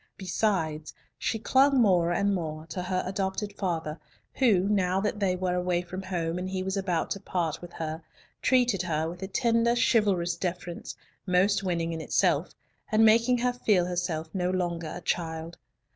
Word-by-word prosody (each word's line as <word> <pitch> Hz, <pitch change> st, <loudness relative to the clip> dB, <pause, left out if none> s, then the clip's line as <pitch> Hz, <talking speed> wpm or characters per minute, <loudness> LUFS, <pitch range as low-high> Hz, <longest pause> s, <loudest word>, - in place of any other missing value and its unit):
Besides, 175 Hz, -5 st, -1 dB, 0.2 s
she 225 Hz, -, -1 dB
clung 265 Hz, +4 st, +4 dB
more 180 Hz, -6 st, +4 dB
and 200 Hz, +3 st, +1 dB
more 155 Hz, -4 st, -4 dB
to 185 Hz, -, -4 dB
her 185 Hz, 0 st, -1 dB
adopted 195 Hz, +2 st, -2 dB
father, 165 Hz, -5 st, -3 dB, 0.3 s
who, 225 Hz, -9 st, +4 dB
now 190 Hz, -2 st, +2 dB
that 210 Hz, +1 st, -1 dB
they 190 Hz, -3 st, +1 dB
were 180 Hz, 0 st, -1 dB
away 180 Hz, -1 st, 0 dB
from 185 Hz, +2 st, -6 dB
home 175 Hz, -2 st, -2 dB
and 185 Hz, +1 st, -4 dB
he 185 Hz, 0 st, -2 dB
was 190 Hz, +1 st, -2 dB
about 185 Hz, -4 st, -1 dB
to 200 Hz, -, -2 dB
part 170 Hz, -5 st, -2 dB
with 175 Hz, -1 st, -10 dB
her, 160 Hz, 0 st, -4 dB, 0.4 s
treated 245 Hz, -7 st, +3 dB
her 160 Hz, -3 st, -1 dB
with 175 Hz, +2 st, -7 dB
a 190 Hz, -, -3 dB
tender, 230 Hz, +2 st, +2 dB
chivalrous 200 Hz, -7 st, +2 dB
deference, 175 Hz, -1 st, -4 dB, 0.3 s
most 190 Hz, +3 st, +3 dB
winning 170 Hz, -3 st, -1 dB
in 160 Hz, -, -4 dB
itself, -, -, +1 dB, 0.4 s
and 220 Hz, +1 st, +5 dB
making 230 Hz, +3 st, +5 dB
her 245 Hz, +1 st, +1 dB
feel 210 Hz, -7 st, +2 dB
herself 175 Hz, -3 st, -2 dB
no 180 Hz, -1 st, 0 dB
longer 175 Hz, -3 st, -2 dB
a 175 Hz, -, -7 dB
child. 165 Hz, -1 st, -3 dB
185 Hz, 175 wpm, -28 LUFS, 170-200 Hz, 0.4 s, and